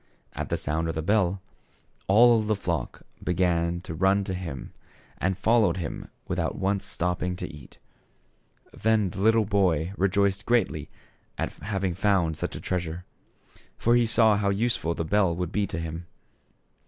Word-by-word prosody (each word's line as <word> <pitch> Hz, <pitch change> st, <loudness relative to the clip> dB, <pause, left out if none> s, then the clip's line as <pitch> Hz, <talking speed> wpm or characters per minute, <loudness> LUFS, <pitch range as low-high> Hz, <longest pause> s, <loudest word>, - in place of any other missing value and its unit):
At -, -, -4 dB
the -, -, 0 dB
sound 80 Hz, +2 st, -2 dB
of 80 Hz, -, -3 dB
the 80 Hz, -, -2 dB
bell, 95 Hz, -1 st, +1 dB, 0.6 s
all 115 Hz, +3 st, +6 dB
the 110 Hz, 0 st, 0 dB
flock 85 Hz, -5 st, -3 dB, 0.2 s
began 85 Hz, -1 st, +1 dB
to 80 Hz, -, -7 dB
run 95 Hz, +4 st, +2 dB
to 95 Hz, -1 st, -4 dB
him, 85 Hz, -7 st, -6 dB, 0.5 s
and 95 Hz, 0 st, 0 dB
followed 110 Hz, -5 st, +3 dB
him 85 Hz, -, -5 dB, 0.2 s
without -, -, -1 dB
once 100 Hz, +1 st, -1 dB
stop 90 Hz, 0 st, -1 dB
THE -, -, -2 dB
SHEPHERD -, -, -1 dB
BOY. -, -, -1 dB
61 90 Hz, -, -5 dB
ping 75 Hz, -, -10 dB
to -, -, -14 dB
eat. -, -, -18 dB, 1.1 s
Then 110 Hz, -3 st, +3 dB
the 95 Hz, -, -6 dB
little 110 Hz, +1 st, +4 dB
boy 95 Hz, -4 st, +1 dB
rejoiced 100 Hz, +1 st, +1 dB
greatly 120 Hz, -1 st, +1 dB, 0.5 s
at -, -, -3 dB
having 95 Hz, -3 st, -2 dB
found 95 Hz, -4 st, +1 dB
such -, -, -4 dB
a -, -, -5 dB
treasure; 90 Hz, -1 st, -3 dB, 0.7 s
for 120 Hz, -, +3 dB
he 120 Hz, -1 st, +3 dB
saw 110 Hz, -2 st, +5 dB
how 100 Hz, -1 st, +1 dB
useful 100 Hz, -5 st, 0 dB
the 85 Hz, -, -2 dB
bell 95 Hz, -1 st, +2 dB
would 90 Hz, -1 st, -3 dB
be 105 Hz, -1 st, 0 dB
to 100 Hz, -, -5 dB
him. 80 Hz, +1 st, -5 dB
95 Hz, 180 wpm, -26 LUFS, 85-105 Hz, 1.1 s, all